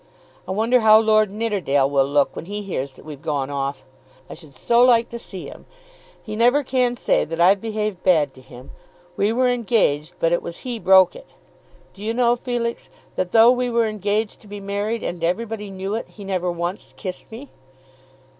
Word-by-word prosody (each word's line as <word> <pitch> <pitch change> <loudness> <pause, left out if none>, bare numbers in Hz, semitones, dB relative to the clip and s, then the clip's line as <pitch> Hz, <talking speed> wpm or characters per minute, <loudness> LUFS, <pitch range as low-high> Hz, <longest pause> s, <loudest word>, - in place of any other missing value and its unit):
I - - -4
wonder 225 +6 +2
how 215 -1 +7
Lord 215 -1 +3
Nidderdale 195 -11 0
will 140 -1 +2
look 145 0 +1
when - - -7
he 205 +3 -5
hears 140 -8 -4
that - - -17
we've 150 -3 -9
gone 145 -3 -2
off. 140 -1 -4 0.4
I - - -9
should 150 -5 -14
so 235 - +3
like 235 -2 +4
to 235 - -7
see 190 -5 -9
him. - - -12 0.5
He 215 - -7
never 245 +6 +3
can 250 -2 0
say - - +1
that 165 +2 -6
I've 190 +3 +5
behaved 215 -4 -3
bad 155 -7 +2
to 130 - -16
him. 125 0 -13 0.4
We 205 +4 +1
were 250 +2 +2
engaged, 205 -10 0
but 165 - +1
it 175 - +1
was 170 - -8
he 245 -3 -4
broke 190 -2 +5
it. - - -14 0.6
Do 200 - -12
you 225 +2 -2
know, 240 -1 +3
Felix, 240 -1 -4 0.2
that 185 -1 -3
though 230 +1 +7
we 250 0 0
were 235 -1 +2
engaged 215 0 -2
to 215 - -17
be 205 0 -8
married, 205 +3 -3
and 175 -1 -5
everybody 210 +4 -2
knew 195 +1 -5
it, 225 - -3
he 205 - -12
never 185 -2 -2
once 175 +3 -5
kissed 185 0 -7
me!" 255 +5 -10
205 Hz, 200 wpm, -21 LUFS, 170-230 Hz, 0.6 s, how